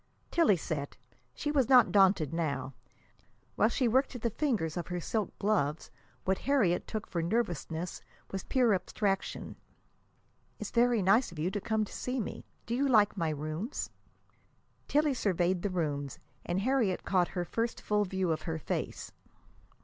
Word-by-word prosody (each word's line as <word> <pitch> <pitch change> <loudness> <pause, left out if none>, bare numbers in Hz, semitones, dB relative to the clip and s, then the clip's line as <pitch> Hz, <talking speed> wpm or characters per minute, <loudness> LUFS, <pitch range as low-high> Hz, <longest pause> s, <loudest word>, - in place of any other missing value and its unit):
Tillie 320 - +4
sat. 145 -3 -4 0.4
She 295 - -2
was 270 -5 +2
not 250 -3 +7
daunted 190 -6 +4
now. 140 -5 -2 0.8
While 215 - +4
she 250 +1 +1
worked 260 +3 +2
at 245 - -7
the 235 - +1
fingers 210 - 0
of 175 -2 -3
her 180 0 -3
silk 210 +4 -2
gloves, 165 -8 0 0.3
what 190 0 +1
Harriet 235 -11 +2
took 215 - -4
for 170 - -2
nervousness 175 -4 -2 0.3
was 195 -1 -4
pure 245 -5 +3
abstraction. 195 +1 -2 1.0
"It's - - -6
very 235 -3 +3
nice 200 +6 +4
of 170 - -11
you 165 +5 -1
to 205 - -3
come 220 +1 0
to - - -12
see 255 +1 -3
me. 215 - -5 0.2
Do 230 - -3
you 275 +3 +2
like 215 -6 +4
my 165 -5 0
rooms?" 155 - -4 1.0
Tillie 295 0 +3
surveyed 185 -5 +1
the 205 - -1
rooms, 145 -6 -2 0.3
and 175 +2 0
Harriet 230 -6 +1
caught 180 -2 +2
her 175 - 0
first 230 +5 -2
full 210 0 +1
view 190 -2 -1
of 155 - -1
her 160 - -1
face. 155 - -4
195 Hz, 165 wpm, -31 LUFS, 170-235 Hz, 1.0 s, not